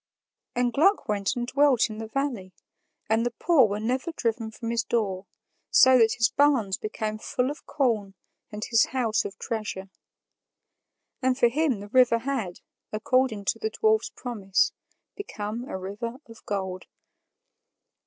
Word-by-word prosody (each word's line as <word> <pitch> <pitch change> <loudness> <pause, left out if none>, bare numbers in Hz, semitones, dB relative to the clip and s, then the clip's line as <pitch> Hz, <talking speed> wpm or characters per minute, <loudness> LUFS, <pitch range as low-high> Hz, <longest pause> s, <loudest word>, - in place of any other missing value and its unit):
And 245 -1 +1
Gluck 385 +8 +3
went 205 +2 0
and 240 -1 -2
dwelt 270 -1 +3
in 215 - -7
the 225 - -5
valley, 230 -7 -3 0.5
and 225 +1 +2
the 240 - +1
poor 300 -9 +4
were 205 0 -3
never 255 +8 -1
driven 230 -6 -2
from 230 +1 -5
his 230 -1 0
door, 195 -5 -2 0.4
so 260 -1 +6
that 225 -1 +4
his 230 -1 +2
barns 265 -9 +2
became 215 0 -4
full 250 +4 -1
of 295 - -11
corn 220 -8 0 0.4
and 210 0 -5
his 230 -1 +4
house 225 -4 +1
of 200 0 -6
treasure. 210 -4 -5 1.3
And 255 -1 +1
for 240 -3 +4
him 270 -5 0
the 205 - -9
river 250 -1 +5
had, 230 -7 -3 0.3
according 220 -1 +1
to - - 0
the 440 - -1
dwarf's 435 0 +1
promise, 205 -6 -1 0.4
become 235 - -5
a 190 - -5
river 205 +6 -5
of 230 0 -14
gold. 190 -2 -3
230 Hz, 155 wpm, -26 LUFS, 210-260 Hz, 1.3 s, so